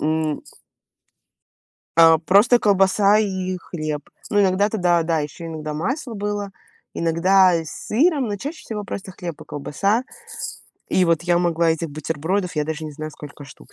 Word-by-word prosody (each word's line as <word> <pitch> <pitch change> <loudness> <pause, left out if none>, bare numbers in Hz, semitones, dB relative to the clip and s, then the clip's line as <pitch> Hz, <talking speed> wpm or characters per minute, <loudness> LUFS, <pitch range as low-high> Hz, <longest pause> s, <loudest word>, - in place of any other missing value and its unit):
м. 155 0 -1 1.5
А 165 -1 +7
просто 205 +9 +5
колбаса 200 0 +4
и 190 -3 -1
хлеб. 155 -5 -5 0.2
Но 205 -1 +3
иногда 195 +1 +3
туда, 175 -5 +2
да, 160 0 0
еще 160 +3 -6
иногда 155 -2 -5
масло 255 - -3
было, 205 -1 -3 0.4
иногда 180 +3 +4
и 165 - -1
с 155 - -8 0.2
сыром, 280 +1 +2
но 205 - -2
чаще 295 - -6
всего 210 -2 -4
просто 190 -1 -6
хлеб 170 -4 -7
и - - -9
колбаса. 200 - -1 0.9
И 185 - +3
вот, 165 -1 +2
я 175 -1 +3
могла 170 -1 +2
этих 160 -1 -2
бутербродов, 160 +5 -2
я 150 - +1
даже 160 +1 -4
не 155 - -6
знаю, 155 +1 -6
сколько 145 -1 -11
штук - - -16
175 Hz, 160 wpm, -22 LUFS, 160-205 Hz, 1.5 s, А